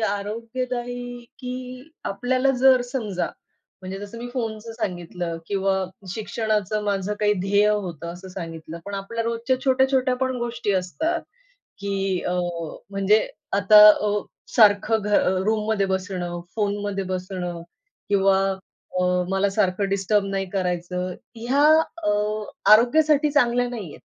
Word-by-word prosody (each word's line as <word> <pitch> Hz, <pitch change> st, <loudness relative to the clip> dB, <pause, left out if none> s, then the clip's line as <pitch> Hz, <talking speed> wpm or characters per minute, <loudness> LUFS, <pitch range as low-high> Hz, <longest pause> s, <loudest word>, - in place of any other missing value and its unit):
आरोग्यदायी 240 Hz, +3 st, -3 dB
की 255 Hz, +2 st, -7 dB
आपल्याला 255 Hz, +6 st, +1 dB
जर 260 Hz, -1 st, +6 dB
समजा, 210 Hz, -8 st, -2 dB, 0.6 s
म्हणजे 190 Hz, +1 st, -6 dB
जसं 205 Hz, +3 st, -8 dB
मी 245 Hz, +1 st, -6 dB
फोनचं 225 Hz, -2 st, -4 dB
सांगितलं 175 Hz, -5 st, -4 dB
किंवा 195 Hz, -1 st, 0 dB, 0.3 s
शिक्षणाचं 215 Hz, -1 st, -1 dB
माझं 200 Hz, 0 st, -1 dB
काही 210 Hz, 0 st, +4 dB
ध्येय 200 Hz, +2 st, +3 dB
होतं 175 Hz, -6 st, -2 dB
असं 185 Hz, +2 st, -10 dB
सांगितलं. 165 Hz, -2 st, -7 dB
पण 200 Hz, 0 st, -6 dB
आपल्या 200 Hz, +4 st, -3 dB
रोजच्या 235 Hz, +3 st, 0 dB
छोट्या-छोट्या 265 Hz, -1 st, +3 dB
पण 260 Hz, -1 st, 0 dB
गोष्टी 235 Hz, -3 st, -2 dB
असतात. 315 Hz, -, -1 dB, 0.6 s
की 195 Hz, -2 st, -1 dB
अ, -, -, 0 dB, 0.6 s
म्हणजे 200 Hz, +2 st, +2 dB, 0.3 s
आता 205 Hz, +2 st, +6 dB
अ, 210 Hz, 0 st, +3 dB, 0.4 s
सारखं 215 Hz, 0 st, +5 dB
घ 210 Hz, -, -3 dB
अ, 185 Hz, -1 st, +3 dB
रूममध्ये 215 Hz, -2 st, +1 dB
बसणं, 185 Hz, -2 st, -3 dB, 0.2 s
फोनमध्ये 205 Hz, -2 st, -1 dB
बसणं 180 Hz, -2 st, -4 dB, 0.5 s
किंवा 195 Hz, -1 st, +4 dB, 0.6 s
अ, -, -, +2 dB, 0.3 s
मला 195 Hz, +1 st, +2 dB
सारखं 195 Hz, 0 st, +1 dB
डिस्टर्ब 195 Hz, +1 st, +1 dB
नाही 195 Hz, -1 st, -2 dB
करायचं, 180 Hz, -1 st, -2 dB, 0.2 s
ह्या 255 Hz, +6 st, +1 dB, 0.4 s
अ, -, -, +2 dB, 0.6 s
आरोग्यासाठी 295 Hz, +6 st, +5 dB
चांगल्या 245 Hz, -4 st, +3 dB
नाहीयेत. 210 Hz, -11 st, -7 dB
205 Hz, 120 wpm, -23 LUFS, 190-240 Hz, 0.6 s, जर